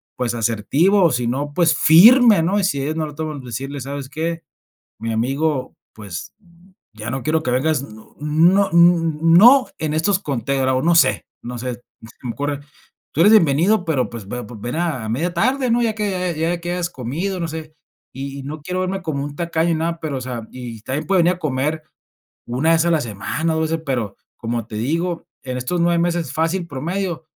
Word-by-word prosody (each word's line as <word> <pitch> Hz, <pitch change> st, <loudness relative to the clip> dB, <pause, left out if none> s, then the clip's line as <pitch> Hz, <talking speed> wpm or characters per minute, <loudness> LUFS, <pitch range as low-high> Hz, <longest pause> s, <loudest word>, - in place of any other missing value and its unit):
pues, 120 Hz, -2 st, -1 dB
asertivo, 150 Hz, -, +2 dB
si 120 Hz, -1 st, -1 dB
no, 145 Hz, +4 st, -2 dB
pues, 165 Hz, -1 st, +3 dB
firme, 215 Hz, -, +7 dB
¿no? 200 Hz, +4 st, +1 dB
Y -, -, 0 dB
si 140 Hz, -7 st, 0 dB
ellos 155 Hz, +3 st, -2 dB
no 155 Hz, -, -1 dB
lo 150 Hz, -, -10 dB
toman 155 Hz, -2 st, -5 dB
pues 120 Hz, -4 st, -7 dB
decirles: 135 Hz, 0 st, -5 dB
"¿Sabes 140 Hz, -1 st, -6 dB
qué, 165 Hz, +3 st, -3 dB, 0.6 s
mi 115 Hz, 0 st, -3 dB
amigo?, 135 Hz, +4 st, -1 dB, 0.2 s
pues, 100 Hz, -6 st, -8 dB, 0.6 s
ya 110 Hz, +1 st, -6 dB
no 135 Hz, -1 st, -4 dB
quiero 155 Hz, +1 st, 0 dB
que 125 Hz, -, -1 dB
vengas", 140 Hz, +2 st, +1 dB
no 110 Hz, -4 st, -14 dB
no, 170 Hz, +7 st, +3 dB
mm, 165 Hz, -1 st, +4 dB
no 255 Hz, +6 st, +7 dB
en 155 Hz, -1 st, -2 dB
estos, 185 Hz, +5 st, +1 dB
conteo, 135 Hz, -, -1 dB
o 130 Hz, -, 0 dB
no 170 Hz, 0 st, +3 dB
sé 165 Hz, -, +3 dB, 0.2 s
no 120 Hz, 0 st, -6 dB
sé, 125 Hz, 0 st, -3 dB
se 120 Hz, -, -22 dB, 0.4 s
me 120 Hz, -, -3 dB
ocurre: 145 Hz, +1 st, -3 dB, 0.5 s
"Tú 165 Hz, -, +1 dB
eres 205 Hz, +4 st, +7 dB
bienvenido, 180 Hz, +3 st, +4 dB
pero 145 Hz, -6 st, 0 dB
pues 115 Hz, -4 st, -9 dB
ve 125 Hz, +3 st, -5 dB
ven 120 Hz, +6 st, -5 dB
a 155 Hz, -10 st, -2 dB
media 165 Hz, +10 st, -1 dB
tarde, 255 Hz, +6 st, +1 dB
¿no? 240 Hz, +1 st, +3 dB
Ya 220 Hz, -2 st, 0 dB
que 185 Hz, -5 st, -2 dB
ya 170 Hz, +2 st, 0 dB
que 175 Hz, 0 st, -4 dB
hayas 175 Hz, -1 st, -2 dB
comido", 165 Hz, +10 st, -3 dB
no 170 Hz, -, -2 dB
sé. 155 Hz, -1 st, -8 dB, 0.4 s
Y 140 Hz, +1 st, -6 dB
y 135 Hz, -, -7 dB
no 150 Hz, +2 st, -7 dB
quiero 180 Hz, +4 st, -3 dB
verme 190 Hz, +1 st, -2 dB
como 140 Hz, -4 st, -2 dB
un 145 Hz, 0 st, -6 dB
tacaño 170 Hz, 0 st, 0 dB
ni 165 Hz, -, +2 dB
nada, 165 Hz, +1 st, -2 dB
pero, 145 Hz, -4 st, -3 dB
o -, -, -5 dB
sea, 120 Hz, -3 st, -6 dB
y 120 Hz, -4 st, -8 dB
también 135 Hz, +5 st, -4 dB
puede 190 Hz, -3 st, +4 dB
venir 180 Hz, +1 st, +3 dB
a -, -, -17 dB
comer 155 Hz, +1 st, -1 dB, 0.6 s
1 135 Hz, +7 st, +1 dB
vez 165 Hz, +1 st, +3 dB
a 170 Hz, -, +2 dB
la 160 Hz, -, +2 dB
semana, 120 Hz, +9 st, -2 dB
2 160 Hz, -, 0 dB
veces, 165 Hz, 0 st, -2 dB
pero, 120 Hz, -7 st, -2 dB, 0.2 s
como 115 Hz, -1 st, -3 dB
te 110 Hz, -, -8 dB
digo, 165 Hz, +8 st, -2 dB, 0.2 s
en 130 Hz, -1 st, -4 dB
estos 170 Hz, +8 st, -2 dB
9 170 Hz, 0 st, +2 dB
meses 170 Hz, -5 st, -1 dB
fácil 165 Hz, +4 st, 0 dB
promedio, 170 Hz, +3 st, -3 dB
155 Hz, 210 wpm, -20 LUFS, 130-170 Hz, 0.6 s, firme